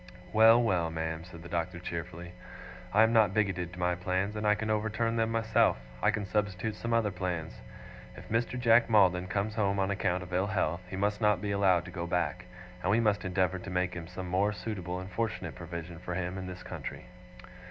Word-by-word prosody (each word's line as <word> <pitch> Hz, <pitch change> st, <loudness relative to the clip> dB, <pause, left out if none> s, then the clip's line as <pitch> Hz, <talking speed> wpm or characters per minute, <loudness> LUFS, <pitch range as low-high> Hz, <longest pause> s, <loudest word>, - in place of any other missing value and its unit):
'Well, 110 Hz, +2 st, +7 dB
well, 90 Hz, -7 st, +1 dB
ma'am,' 80 Hz, 0 st, -4 dB
said 85 Hz, -2 st, -11 dB
the -, -, -8 dB
Doctor 85 Hz, +1 st, -2 dB
cheerfully, 85 Hz, 0 st, -6 dB, 0.6 s
'I 105 Hz, +3 st, +6 dB
am 110 Hz, +1 st, +3 dB
not 110 Hz, -4 st, +4 dB
bigoted 95 Hz, -5 st, 0 dB
to 90 Hz, -, -10 dB
my 90 Hz, 0 st, +2 dB
plans, 95 Hz, +3 st, -1 dB
and 105 Hz, 0 st, -1 dB
I 105 Hz, -, +5 dB
can 110 Hz, +1 st, -2 dB
overturn 110 Hz, +2 st, 0 dB
them 115 Hz, -1 st, +1 dB
myself. 115 Hz, -1 st, +3 dB, 0.2 s
I -, -, +4 dB
can 105 Hz, -, -1 dB
substitute 105 Hz, +1 st, -1 dB
some 115 Hz, +2 st, -5 dB
other 115 Hz, -3 st, +2 dB
plans. 90 Hz, -3 st, -4 dB, 0.6 s
If -, -, -11 dB
Mr. 120 Hz, +3 st, -1 dB
Jack 115 Hz, -1 st, +5 dB
Maldon 95 Hz, -4 st, +4 dB
comes 100 Hz, +3 st, -1 dB
home 100 Hz, -3 st, +1 dB
on 95 Hz, 0 st, +1 dB
account 90 Hz, -2 st, 0 dB
of 90 Hz, +1 st, -10 dB
ill 95 Hz, +2 st, +1 dB
health, 90 Hz, -4 st, 0 dB
he 95 Hz, -, -5 dB
must 105 Hz, +3 st, 0 dB
not 105 Hz, -3 st, +3 dB
be 105 Hz, +1 st, -3 dB
allowed 95 Hz, -4 st, +3 dB
to 90 Hz, -, -8 dB
go 85 Hz, -1 st, -4 dB
back, 90 Hz, +1 st, -1 dB, 0.4 s
and 95 Hz, -, -1 dB
we 105 Hz, +4 st, +4 dB
must 105 Hz, -3 st, +2 dB
endeavour 95 Hz, 0 st, 0 dB
to 100 Hz, -, -8 dB
make 90 Hz, 0 st, -1 dB
some 90 Hz, +1 st, -6 dB
more 95 Hz, +4 st, +2 dB
suitable 95 Hz, -4 st, -4 dB
and 95 Hz, +1 st, -8 dB
fortunate 95 Hz, -5 st, -2 dB
provision 85 Hz, -1 st, -7 dB
for 90 Hz, 0 st, -5 dB
him 90 Hz, 0 st, -2 dB
in 95 Hz, -1 st, -5 dB
this 90 Hz, 0 st, -8 dB
country. -, -, -7 dB
95 Hz, 210 wpm, -30 LUFS, 90-105 Hz, 0.6 s, Well